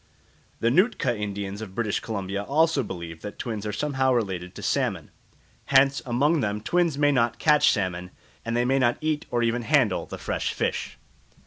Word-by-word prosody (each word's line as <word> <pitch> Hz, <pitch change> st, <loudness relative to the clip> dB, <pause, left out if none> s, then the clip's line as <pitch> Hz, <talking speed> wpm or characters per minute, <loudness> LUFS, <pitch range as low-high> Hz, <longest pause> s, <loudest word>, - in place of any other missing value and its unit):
The 115 Hz, -, +3 dB
Nootka 160 Hz, -, +2 dB
Indians 100 Hz, -1 st, -4 dB
of 95 Hz, -4 st, -8 dB
British 110 Hz, -3 st, 0 dB
Columbia 100 Hz, -2 st, -4 dB
also 155 Hz, +6 st, +2 dB
believe 85 Hz, -7 st, -7 dB
that 105 Hz, -1 st, -7 dB
twins 110 Hz, -4 st, -4 dB
are -, -, -2 dB
somehow 130 Hz, +3 st, 0 dB
related 95 Hz, -6 st, -2 dB
to -, -, -8 dB
salmon. -, -, -1 dB, 0.5 s
Hence 135 Hz, +1 st, +4 dB
among 145 Hz, +7 st, +2 dB
them 105 Hz, -4 st, -1 dB
twins 170 Hz, +6 st, +1 dB
may 145 Hz, 0 st, +4 dB
not 120 Hz, -3 st, +1 dB
catch 150 Hz, +3 st, +4 dB
salmon, 90 Hz, -3 st, -1 dB, 0.3 s
and 115 Hz, +1 st, -2 dB
they 120 Hz, -, +2 dB
may 135 Hz, +2 st, +2 dB
not 120 Hz, -2 st, +2 dB
eat 155 Hz, -1 st, -2 dB
or 120 Hz, -1 st, 0 dB
even 115 Hz, +1 st, +1 dB
handle 120 Hz, -6 st, +2 dB
the -, -, -7 dB
fresh -, -, -2 dB
fish. -, -, -2 dB
120 Hz, 180 wpm, -25 LUFS, 100-140 Hz, 0.5 s, Hence